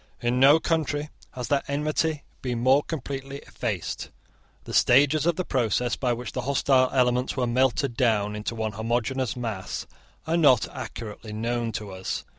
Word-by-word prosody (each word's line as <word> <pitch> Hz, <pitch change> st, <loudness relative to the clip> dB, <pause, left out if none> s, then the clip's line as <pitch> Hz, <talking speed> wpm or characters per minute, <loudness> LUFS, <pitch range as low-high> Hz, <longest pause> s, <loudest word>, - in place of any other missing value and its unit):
In 120 Hz, +1 st, 0 dB
no 140 Hz, +4 st, +7 dB
country 150 Hz, -2 st, -1 dB, 0.2 s
has 125 Hz, -2 st, -5 dB
that 140 Hz, -1 st, +1 dB
enmity 150 Hz, +1 st, -1 dB, 0.2 s
been 125 Hz, -2 st, -2 dB
more 130 Hz, +4 st, +4 dB
completely 140 Hz, -3 st, -5 dB
effaced. 100 Hz, -9 st, -4 dB, 0.5 s
The -, -, -8 dB
stages 145 Hz, +5 st, +4 dB
of 170 Hz, -, +3 dB
the 185 Hz, -, -2 dB
process 120 Hz, 0 st, 0 dB
by 125 Hz, -2 st, 0 dB
which 120 Hz, +1 st, -4 dB
the 130 Hz, -, -3 dB
hostile 130 Hz, 0 st, +3 dB
elements 125 Hz, 0 st, +1 dB
were 125 Hz, -, +1 dB
melted 130 Hz, +1 st, +1 dB
down 105 Hz, -4 st, +1 dB
into 105 Hz, +2 st, -4 dB
one 110 Hz, -1 st, -2 dB
homogeneous 120 Hz, +4 st, -1 dB
mass 110 Hz, -6 st, -4 dB, 0.4 s
are 165 Hz, +1 st, +1 dB
not 135 Hz, -9 st, +5 dB
accurately 110 Hz, -1 st, -7 dB
known 115 Hz, +1 st, -1 dB
to 105 Hz, -1 st, -5 dB
us. 95 Hz, 0 st, -4 dB
125 Hz, 160 wpm, -26 LUFS, 115-140 Hz, 0.5 s, no